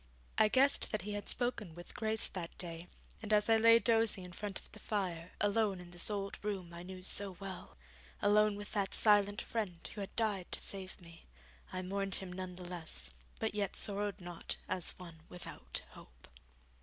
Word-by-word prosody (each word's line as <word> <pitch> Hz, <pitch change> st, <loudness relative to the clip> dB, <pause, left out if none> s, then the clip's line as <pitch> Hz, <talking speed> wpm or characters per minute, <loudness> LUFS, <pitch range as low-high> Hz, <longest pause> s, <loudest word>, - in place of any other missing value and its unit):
I 215 Hz, -, +8 dB
guessed 270 Hz, +5 st, +4 dB
that 215 Hz, -, -1 dB
he 210 Hz, -, -3 dB
had 205 Hz, 0 st, -4 dB
spoken 235 Hz, -9 st, -1 dB
with 175 Hz, 0 st, -9 dB
Grace 220 Hz, -1 st, -1 dB
that 170 Hz, -3 st, -6 dB
day, 170 Hz, -1 st, -5 dB, 0.3 s
and 215 Hz, -1 st, -4 dB
as 210 Hz, +1 st, +5 dB
I 225 Hz, -, +8 dB
lay 230 Hz, +1 st, +8 dB
dozing 225 Hz, -4 st, +4 dB
in 180 Hz, -, -9 dB
front 205 Hz, 0 st, -3 dB
of -, -, -11 dB
the 215 Hz, -, -11 dB
fire, 180 Hz, -5 st, -2 dB
alone 205 Hz, -2 st, +2 dB
in 175 Hz, -1 st, -10 dB
this 175 Hz, +3 st, +2 dB
old 200 Hz, -1 st, -3 dB
room 190 Hz, -5 st, -3 dB
I 170 Hz, -, -7 dB
knew 185 Hz, +1 st, -8 dB
so 195 Hz, -1 st, +1 dB
well, 195 Hz, -, -7 dB, 0.4 s
alone 210 Hz, 0 st, +5 dB
with 205 Hz, 0 st, -7 dB
that 200 Hz, -2 st, 0 dB
silent 205 Hz, 0 st, +4 dB
friend 195 Hz, -7 st, -3 dB
who 210 Hz, -, -5 dB
had 195 Hz, -, -6 dB
died 210 Hz, -5 st, +1 dB
to -, -, 0 dB
save 190 Hz, -1 st, -4 dB
me, 170 Hz, -2 st, -14 dB, 0.4 s
I 185 Hz, 0 st, -3 dB
mourned 195 Hz, +1 st, 0 dB
him 185 Hz, -2 st, -1 dB
none 185 Hz, 0 st, -5 dB
the 180 Hz, 0 st, -8 dB
less, 160 Hz, -, -6 dB, 0.3 s
but -, -, -1 dB
yet 205 Hz, -2 st, -1 dB
sorrowed 205 Hz, -1 st, -1 dB
not 175 Hz, -2 st, -3 dB
as 185 Hz, -3 st, +1 dB
one 170 Hz, -3 st, -10 dB
without 180 Hz, -, -4 dB
hope. -, -, -15 dB
195 Hz, 195 wpm, -35 LUFS, 180-210 Hz, 0.4 s, I